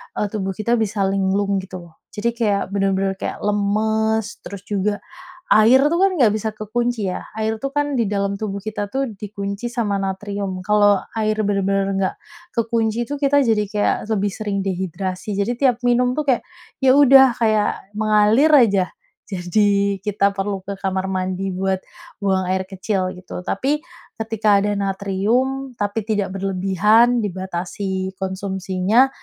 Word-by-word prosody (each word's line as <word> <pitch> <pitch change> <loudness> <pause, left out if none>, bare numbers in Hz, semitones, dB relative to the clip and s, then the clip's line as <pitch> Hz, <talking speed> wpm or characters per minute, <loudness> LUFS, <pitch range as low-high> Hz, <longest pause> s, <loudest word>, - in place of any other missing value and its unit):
eee, 205 -1 -2
tubuh 195 -3 -3
kita 235 +2 0
bisa 210 -2 0
linglung 195 +1 +1
gitu 190 0 -9 0.2
loh. - - -28
Jadi 235 +3 -2
kayak 210 -5 -1
benar-benar 195 -1 0
kayak - - -5
lemas, 215 +1 0
terus 200 -1 -9
juga, 205 0 -1 0.5
air 230 +5 +6
tuh 335 - +1
kan 385 +1 +3
enggak 245 - +3
bisa 220 +1 -2
kekunci 220 0 -2
ya, 180 - -5
air 220 +1 -2
tuh 275 +5 -5
kan 290 -2 0
di 230 - +2
dalam 200 0 -1
tubuh 200 -2 -4
kita 210 0 -3
tuh 270 -1 0
dikunci 200 +1 -5
sama 235 -5 -1
natrium, 195 -1 -3
kalau 205 0 +3 0.2
air 215 0 +1
benar-benar 195 -1 +1
enggak 195 -1 -1 0.4
ke 230 - +2
kunci 225 0 0
itu, 290 - -2
kita 285 0 +3
jadi 225 -4 +2
kayak 205 +1 +1 0.2
lebih 205 -1 0
sering 200 -1 -3
dehidrasi. 190 +1 -3
Jadi 200 +5 -1
tiap 250 -2 +2
minum 245 +1 +2
tuh 305 - -1
kayak, 250 - +2 0.4
ya 260 - +7
udah, 270 -2 +7
kayak 215 -2 +2 0.2
mengalir 215 +7 +4
aja. 200 -9 +5 0.4
Jadi 200 +1 +1
kita 200 -1 +2
perlu 195 -1 -2
ke 200 0 -5
kamar 190 -1 -2
mandi 185 0 -2
buat 190 0 -1 0.4
buang 190 -2 +1
air 190 0 0
kecil 190 0 -2
gitu, 180 0 -8
tapi 275 +11 0 0.4
ketika 220 -2 +2
ada 205 0 0
natrium, 210 +7 -1
tapi 205 +1 -1
tidak 210 -4 -1
berlebihan, 195 +5 +3
dibatasi 190 0 -4
konsumsinya, 190 +5 +1
205 Hz, 155 wpm, -21 LUFS, 195-225 Hz, 0.5 s, ya